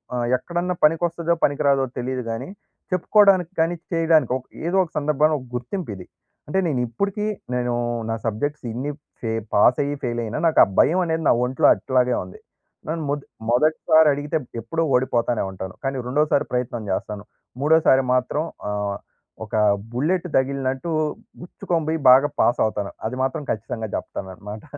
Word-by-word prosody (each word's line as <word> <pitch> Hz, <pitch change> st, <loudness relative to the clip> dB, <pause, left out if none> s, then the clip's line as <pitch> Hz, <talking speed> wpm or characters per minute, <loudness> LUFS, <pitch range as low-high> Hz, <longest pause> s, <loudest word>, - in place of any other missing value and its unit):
ఆహ్, 120 Hz, -1 st, -1 dB
ఎక్కడన్నా 175 Hz, +6 st, -3 dB
పనికొస్తదో 170 Hz, +1 st, +2 dB
పనికి 145 Hz, 0 st, +2 dB
రాదో 135 Hz, -1 st, +3 dB
తెలీదు 130 Hz, +1 st, -2 dB
గాని 115 Hz, +4 st, -4 dB, 0.4 s
చెప్పుకోడానికి 185 Hz, -1 st, +4 dB
కానీ 165 Hz, +2 st, +2 dB, 0.2 s
చేయడానికి 165 Hz, -6 st, +3 dB
ఓక్ 130 Hz, -, -6 dB, 0.2 s
ఏదో 175 Hz, +3 st, +1 dB
ఒక 170 Hz, -, -9 dB
సందర్భంలో 150 Hz, +1 st, +2 dB
ఒక 130 Hz, -, -12 dB
గుర్తింపిది. 120 Hz, -, -5 dB, 0.4 s
అంటే 190 Hz, +6 st, 0 dB
నేను 140 Hz, -6 st, 0 dB
ఇప్పటికి 200 Hz, -, -2 dB, 0.3 s
నేను 125 Hz, -1 st, 0 dB, 0.4 s
నా 115 Hz, -, 0 dB
సబ్జెక్ట్స్ 140 Hz, +8 st, -2 dB
ఇన్ని 130 Hz, +6 st, -3 dB, 0.3 s
ఫే 115 Hz, -, -2 dB, 0.2 s
పాస్ 120 Hz, +4 st, +5 dB
అయ్యి 145 Hz, +1 st, -2 dB
ఫెయిల్ 120 Hz, -1 st, -1 dB
అయినా 115 Hz, +5 st, -4 dB
నాకు 160 Hz, -, +3 dB
ఆ -, -, +6 dB
భయం 180 Hz, +4 st, +4 dB
అనేది 160 Hz, -1 st, -1 dB
నా -, -, +6 dB
ఒంట్లో 130 Hz, +1 st, +2 dB
అట్లాగే 125 Hz, -1 st, +1 dB
ఉంది. 90 Hz, -, -12 dB, 0.5 s
నన్ను 160 Hz, 0 st, -2 dB
మొద్ 145 Hz, 0 st, -2 dB, 0.3 s
మొదటిసారి 155 Hz, +4 st, +4 dB
అడిగితే 145 Hz, +3 st, -2 dB, 0.2 s
ఎప్పుడో 165 Hz, +9 st, -2 dB
ఓడిపోతానే 120 Hz, -2 st, +1 dB
ఉంటాను. 95 Hz, -1 st, -7 dB
కానీ 135 Hz, 0 st, -1 dB
రెండోసారి 150 Hz, +2 st, +2 dB
ప్రయత్నం 120 Hz, -3 st, -2 dB
జేస్తాను. 100 Hz, +2 st, -4 dB, 0.4 s
మూడోసారి 150 Hz, -3 st, +4 dB
మాత్రం 130 Hz, +4 st, 0 dB, 0.3 s
ఆహ్, 100 Hz, -1 st, -2 dB, 0.5 s
ఒక 105 Hz, -, -19 dB, 0.4 s
బుల్లెట్ 165 Hz, +9 st, 0 dB
తగిలినట్టు 135 Hz, +2 st, -1 dB, 0.5 s
గుచ్చుకొని 170 Hz, -2 st, -3 dB
బోయి 160 Hz, 0 st, 0 dB
బాగా 135 Hz, +3 st, +6 dB
పాస్ 120 Hz, -, +2 dB
అవుతాను. 105 Hz, -2 st, -3 dB
అది 125 Hz, -, -5 dB
మాత్రం 145 Hz, +3 st, -2 dB
ఖచ్చితంగా 110 Hz, +1 st, -4 dB
చెప్తానన్నమాట. 100 Hz, +2 st, -7 dB
135 Hz, 150 wpm, -22 LUFS, 120-160 Hz, 0.5 s, ఆ